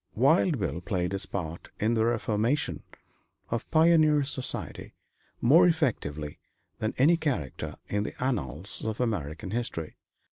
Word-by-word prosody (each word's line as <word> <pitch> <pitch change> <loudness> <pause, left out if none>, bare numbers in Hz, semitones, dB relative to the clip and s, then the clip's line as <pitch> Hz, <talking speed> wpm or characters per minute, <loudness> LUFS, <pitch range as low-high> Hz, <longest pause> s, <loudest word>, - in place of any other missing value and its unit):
Wild 150 - +4
Bill 85 - -2
played 90 -1 -1
his 100 0 -1
part 85 -3 -5
in 110 +2 +2
the 110 -1 +2
reformation 115 +4 +1 0.7
of 115 -1 -2
pioneer 155 -2 +5
society 135 -2 -3 0.5
more 165 +9 +6
effectively 80 - -1 0.4
than 110 - -2
any 155 +6 +5
character 130 - -3
in 100 - 0
the 105 - -4
annals 90 - -3
of 110 0 -3
American 95 - -2
history. 110 -9 -3
115 Hz, 130 wpm, -28 LUFS, 90-145 Hz, 0.7 s, more